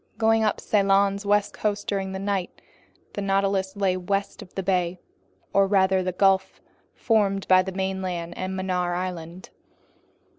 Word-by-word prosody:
Going 225 Hz, 0 st, +3 dB
up 215 Hz, -, +1 dB
Ceylon's 200 Hz, 0 st, +2 dB
west 205 Hz, 0 st, +2 dB
coast 205 Hz, -1 st, -2 dB
during 195 Hz, -1 st, -2 dB
the 190 Hz, -, -4 dB
night, 195 Hz, -2 st, -3 dB, 0.5 s
the 205 Hz, -, -4 dB
Nautilus 195 Hz, -1 st, 0 dB
lay 195 Hz, -2 st, +1 dB
west 195 Hz, +2 st, -2 dB
of 180 Hz, -, -14 dB
the 195 Hz, -, -2 dB
bay, 180 Hz, -2 st, 0 dB, 0.6 s
or 195 Hz, 0 st, +4 dB
rather 190 Hz, -1 st, +3 dB
that 185 Hz, -1 st, -4 dB
gulf 195 Hz, -1 st, +2 dB, 0.4 s
formed 200 Hz, -4 st, +1 dB
by 185 Hz, 0 st, +6 dB
the 190 Hz, +1 st, -5 dB
mainland 185 Hz, -3 st, -3 dB
and 185 Hz, 0 st, -4 dB
Mannar 180 Hz, -2 st, -1 dB
Island. 180 Hz, -1 st, -6 dB
190 Hz, 150 wpm, -25 LUFS, 185-200 Hz, 0.6 s, by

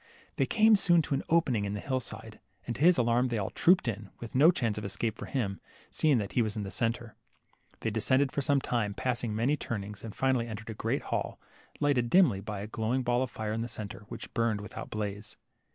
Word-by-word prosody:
They -, -, +2 dB
came 220 Hz, 0 st, +5 dB
soon 175 Hz, -4 st, +4 dB
to 150 Hz, -, -3 dB
an 135 Hz, -, +1 dB
opening 145 Hz, -10 st, +2 dB
in 100 Hz, 0 st, -2 dB
the -, -, -3 dB
hill 130 Hz, +4 st, -1 dB
side, 110 Hz, -2 st, -9 dB, 0.3 s
and 120 Hz, -, -3 dB
to -, -, -8 dB
his 175 Hz, +1 st, +6 dB
alarm 120 Hz, +1 st, +3 dB
they 120 Hz, -2 st, -1 dB
all 100 Hz, -2 st, -2 dB
trooped 180 Hz, -5 st, +4 dB
in, 105 Hz, -3 st, -3 dB
with 115 Hz, -, -8 dB
no 145 Hz, +6 st, +7 dB
chance 115 Hz, -, 0 dB
of -, -, -8 dB
escape 110 Hz, +2 st, -2 dB
for -, -, -8 dB
him, 100 Hz, -8 st, -2 dB, 0.3 s
seeing 150 Hz, -4 st, +3 dB
that 100 Hz, -3 st, -2 dB
he 125 Hz, -, +2 dB
was 110 Hz, -1 st, -1 dB
in 105 Hz, -, -2 dB
the 95 Hz, -, -6 dB
centre. 115 Hz, 0 st, -2 dB, 0.7 s
They 115 Hz, -, -1 dB
descended 130 Hz, +5 st, +2 dB
for 140 Hz, -, -1 dB
some 140 Hz, 0 st, +2 dB
time, 105 Hz, -6 st, -1 dB
passing 120 Hz, -3 st, -1 dB
many 125 Hz, +7 st, +2 dB
turnings, 105 Hz, -5 st, -5 dB
and 110 Hz, -2 st, -7 dB
finally 130 Hz, -3 st, +1 dB
entered 110 Hz, 0 st, -6 dB
a -, -, -4 dB
great -, -, -2 dB
hall, -, -, -3 dB, 0.4 s
lighted 140 Hz, -5 st, +2 dB
dimly 160 Hz, -, +5 dB
by 105 Hz, -1 st, -5 dB
a 105 Hz, -, -5 dB
glowing 115 Hz, +4 st, -1 dB
ball 120 Hz, 0 st, +1 dB
of 130 Hz, -, -1 dB
fire 110 Hz, -2 st, -4 dB
in 115 Hz, -, -2 dB
the 115 Hz, -, -2 dB
centre, 105 Hz, -3 st, -7 dB
which -, -, -8 dB
burned 115 Hz, -3 st, +1 dB
with 105 Hz, -, -9 dB
out -, -, -6 dB
blaze. 105 Hz, 0 st, -5 dB
115 Hz, 235 wpm, -30 LUFS, 105-130 Hz, 0.7 s, no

